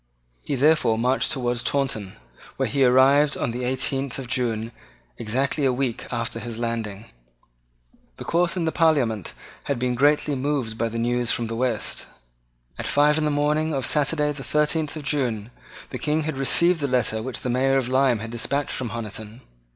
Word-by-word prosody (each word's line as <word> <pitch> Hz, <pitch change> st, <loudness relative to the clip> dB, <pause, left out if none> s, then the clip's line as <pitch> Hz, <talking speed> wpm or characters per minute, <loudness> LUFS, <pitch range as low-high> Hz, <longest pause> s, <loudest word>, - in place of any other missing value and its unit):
He 140 Hz, -, -3 dB
therefore 140 Hz, -5 st, +3 dB
marched 125 Hz, +3 st, +2 dB
towards 125 Hz, -3 st, -1 dB
Taunton, 125 Hz, -8 st, -1 dB, 0.4 s
where -, -, 0 dB
he 140 Hz, -1 st, +1 dB
arrived 135 Hz, +4 st, +5 dB
on 125 Hz, -, -1 dB
the 125 Hz, +2 st, -4 dB
eighteenth 130 Hz, +1 st, 0 dB
of 135 Hz, -, -5 dB
June, 120 Hz, -3 st, -1 dB, 0.5 s
exactly 130 Hz, +6 st, 0 dB
a 135 Hz, -, +3 dB
week 125 Hz, -2 st, -2 dB
after 115 Hz, -1 st, -3 dB
his 115 Hz, 0 st, -6 dB
landing. 115 Hz, -3 st, -4 dB, 1.1 s
The -, -, -9 dB
Court 175 Hz, +1 st, +1 dB
and 175 Hz, -3 st, -1 dB
the 160 Hz, -, 0 dB
Parliament 135 Hz, -, +1 dB, 0.3 s
had 140 Hz, -, -1 dB
been 125 Hz, +1 st, -1 dB
greatly 145 Hz, +3 st, +2 dB
moved 135 Hz, -4 st, -2 dB
by 115 Hz, 0 st, -1 dB
the 115 Hz, -, -5 dB
news 120 Hz, 0 st, 0 dB
from 120 Hz, -, -1 dB
the 115 Hz, 0 st, -4 dB
West. 120 Hz, -3 st, -1 dB, 0.7 s
At -, -, -3 dB
five 150 Hz, +2 st, +3 dB
in 155 Hz, -, 0 dB
the -, -, +2 dB
morning 150 Hz, +1 st, +1 dB
of 135 Hz, -3 st, -1 dB
Saturday 150 Hz, +2 st, +1 dB
the 140 Hz, -2 st, -7 dB
thirteenth 150 Hz, +1 st, 0 dB
of 155 Hz, -, -6 dB
June, 125 Hz, -6 st, -1 dB, 0.4 s
the -, -, -5 dB
King 155 Hz, +1 st, 0 dB
had 155 Hz, -1 st, -3 dB
received 170 Hz, +6 st, +3 dB
the 140 Hz, -, 0 dB
letter 115 Hz, -4 st, 0 dB
which 125 Hz, +1 st, -5 dB
the 125 Hz, -, -3 dB
Mayor 135 Hz, +2 st, +2 dB
of 130 Hz, -3 st, 0 dB
Lyme 130 Hz, -1 st, +3 dB
had 115 Hz, 0 st, -6 dB
despatched 140 Hz, +4 st, -2 dB
from 125 Hz, -3 st, -2 dB
Honiton. 110 Hz, +1 st, -6 dB
130 Hz, 180 wpm, -24 LUFS, 115-145 Hz, 1.1 s, arrived